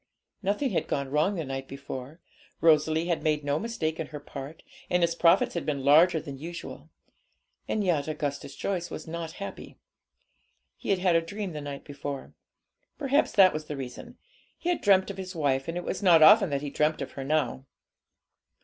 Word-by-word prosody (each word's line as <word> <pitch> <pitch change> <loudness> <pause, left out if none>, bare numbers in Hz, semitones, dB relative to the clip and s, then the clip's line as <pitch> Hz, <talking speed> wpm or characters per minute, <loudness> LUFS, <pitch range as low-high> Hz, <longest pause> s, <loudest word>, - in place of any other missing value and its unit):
Nothing 205 +7 0
had 180 - -1
gone 140 -2 -2
wrong 155 +8 +2
the 165 -4 -3
night 135 0 -5
before; 140 +3 -8 0.4
Rosalie 160 0 +3
had 170 -2 0
made 150 -1 0
no 145 +1 0
mistake 170 -9 -3
in 160 - -3
her 150 -1 -8
part, 145 +1 -9 0.3
and 180 -1 +2
his 170 0 +2
profits 170 +2 +4
had 170 - -2
been 140 -3 -2
larger 160 +4 +6
than 140 -3 -8
usual. 170 +3 -8 0.8
And 215 - 0
yet 160 -6 +1
Augustus 145 -3 -4
Joyce 175 -3 -2
was 155 - -7
not 165 0 -5
happy. 200 +2 -8 1.0
He - - -8
had 195 - +3
had 180 -2 +2
a 165 - +4
dream 195 +2 -5
the 150 - -5
night 140 -1 -6
before; 140 -1 -6 0.6
perhaps 285 0 +2
that 190 -3 +6
was 155 0 -4
the 150 -1 -6
reason. 125 -2 -8 0.4
He 350 - -3
had 350 - 0
dreamt 195 -1 +4
of 195 - -10
his 190 -1 -6
wife; 135 -4 0
and 165 +1 -3
it 175 - -3
was - - -3
not 170 -5 +6
often 205 +1 +8
that 140 0 -2
he 145 - -4
dreamt 150 +2 +1
of - - -8
her 135 - -6
now. 135 -2 -1
160 Hz, 195 wpm, -28 LUFS, 145-180 Hz, 1.0 s, often